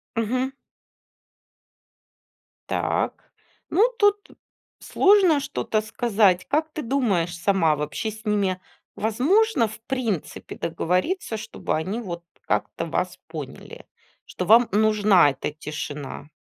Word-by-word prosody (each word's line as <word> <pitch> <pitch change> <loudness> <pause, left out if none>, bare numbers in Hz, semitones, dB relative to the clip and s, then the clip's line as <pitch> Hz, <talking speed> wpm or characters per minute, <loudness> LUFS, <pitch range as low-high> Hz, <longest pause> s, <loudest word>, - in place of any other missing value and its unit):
Мгм. 250 +4 0 2.2
Так, - - -2 0.4
ну 415 +9 +4
тут 410 0 +3 0.5
сложно 385 -6 +4
что-то 220 -5 -2
сказать. 215 -4 +2
Как 310 +3 0
ты 305 - -5
думаешь 205 -10 0
сама, 175 -3 +2
вообще 150 +9 -3
с 220 +1 -13
ними 195 -3 0 0.3
возможно, 260 - +2
в 220 - -10
принципе, 235 - -3
договориться, 185 - -1
чтобы - - -4
они 190 +9 -2
вот 175 -6 -6 0.2
как-то - - -1
вас - - -2
поняли, - - -9 0.4
что 180 - -5
вам 225 +4 +6
нужна 210 -6 +4
эта 140 - -4
тишина? 150 -1 -7
215 Hz, 105 wpm, -24 LUFS, 180-265 Hz, 2.2 s, вам